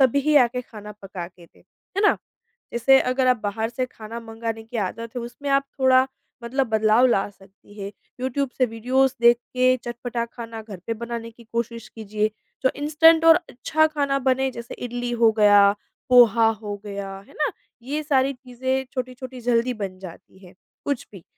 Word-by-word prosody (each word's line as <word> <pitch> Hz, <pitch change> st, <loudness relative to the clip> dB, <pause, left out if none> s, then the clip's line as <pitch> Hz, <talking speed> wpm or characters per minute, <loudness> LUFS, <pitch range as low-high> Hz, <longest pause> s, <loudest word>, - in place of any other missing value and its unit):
तभी 280 Hz, +3 st, +3 dB
आके 250 Hz, -1 st, +4 dB
खाना 210 Hz, -3 st, -10 dB
पका 185 Hz, -3 st, -6 dB
के 175 Hz, -1 st, -18 dB
दे, -, -, -27 dB, 0.4 s
है 395 Hz, -, +2 dB
ना? 415 Hz, -, +5 dB, 0.6 s
जैसे 265 Hz, +3 st, +5 dB
अगर 255 Hz, +1 st, +1 dB
आप 250 Hz, -1 st, +4 dB
बाहर 220 Hz, +2 st, -2 dB
से 255 Hz, +1 st, -2 dB
खाना 230 Hz, -1 st, -9 dB
मँगाने 225 Hz, 0 st, -5 dB
की 225 Hz, +1 st, -7 dB
आदत 230 Hz, +5 st, -7 dB
है 245 Hz, -, -2 dB
उसमें 245 Hz, +4 st, -6 dB
आप 275 Hz, 0 st, +3 dB, 0.2 s
थोड़ा 260 Hz, 0 st, +5 dB, 0.4 s
मतलब 260 Hz, +3 st, 0 dB
बदलाव 220 Hz, +2 st, +4 dB
ला 200 Hz, -5 st, +1 dB
सकती 195 Hz, +1 st, -20 dB
हैं, 200 Hz, 0 st, -5 dB, 0.3 s
यूट्यूब 260 Hz, +1 st, -1 dB
से 255 Hz, -, +4 dB
वीडियोज़ 250 Hz, +3 st, +1 dB
देख 235 Hz, 0 st, +6 dB, 0.2 s
के 255 Hz, 0 st, +4 dB
चटपटा 240 Hz, 0 st, -3 dB
खाना 230 Hz, -2 st, -7 dB
घर 210 Hz, -3 st, -9 dB
पे 230 Hz, -, 0 dB
बनाने 230 Hz, 0 st, -6 dB
की 235 Hz, +1 st, -17 dB
कोशिश 235 Hz, 0 st, -3 dB
कीजिए। 215 Hz, -1 st, -2 dB, 0.3 s
जो 260 Hz, -, +4 dB
इंस्टेंट 320 Hz, +3 st, +4 dB
और 325 Hz, 0 st, +9 dB
अच्छा 315 Hz, +6 st, +1 dB
खाना 285 Hz, -3 st, 0 dB
बने 265 Hz, 0 st, +1 dB
जैसे 235 Hz, -1 st, -8 dB
इडली 245 Hz, 0 st, -4 dB
हो 225 Hz, -1 st, +6 dB
गया, 205 Hz, -1 st, +6 dB, 0.4 s
पोहा 235 Hz, -2 st, +6 dB
हो 215 Hz, -2 st, -4 dB
गया, 200 Hz, -1 st, -5 dB, 0.2 s
है -, -, -18 dB
ना, 300 Hz, -, 0 dB, 0.3 s
ये 290 Hz, +5 st, -3 dB
सारी 275 Hz, -2 st, +2 dB
चीज़ें 260 Hz, +1 st, -3 dB
छोटी-छोटी 255 Hz, 0 st, -6 dB
जल्दी 240 Hz, +1 st, +1 dB
बन 195 Hz, -4 st, -5 dB
जाती 185 Hz, 0 st, -12 dB
हैं, 180 Hz, -, -15 dB, 0.3 s
कुछ 285 Hz, -4 st, -2 dB
भी, 190 Hz, -5 st, -12 dB
240 Hz, 180 wpm, -23 LUFS, 220-260 Hz, 0.6 s, और